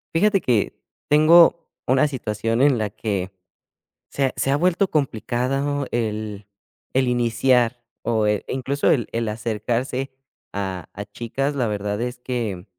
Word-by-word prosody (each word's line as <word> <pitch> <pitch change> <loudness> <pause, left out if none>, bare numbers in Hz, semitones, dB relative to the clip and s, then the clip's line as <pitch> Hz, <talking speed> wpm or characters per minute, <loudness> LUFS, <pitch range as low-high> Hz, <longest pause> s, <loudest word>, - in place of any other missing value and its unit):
Fíjate 200 +2 +3
que 115 -5 +1 0.3
tengo 165 +3 +6 0.2
una 130 +3 +4
situación 115 -2 -2
en 140 -3 +4
la 110 -2 -1
que 100 -2 -3 0.8
se 140 - 0
ha - - -5
se - - 0
ha - - +3
vuelto 180 +5 +2
complicado 135 +1 -1
el 105 -3 -3 0.5
el 130 -1 +2
iniciar, 120 0 +2 0.2
o, 110 -2 +1
eh, 105 -1 +1
incluso, 135 +2 0
el 120 -6 +2
el 115 0 -1
acercarse 120 +4 -2 0.4
a 95 -3 -4
a 100 - -5
chicas. 120 +7 -3
La 130 -4 0
verdad, 105 0 -2
es 125 +1 -3
que 115 -8 -3
120 Hz, 140 wpm, -22 LUFS, 105-135 Hz, 0.8 s, tengo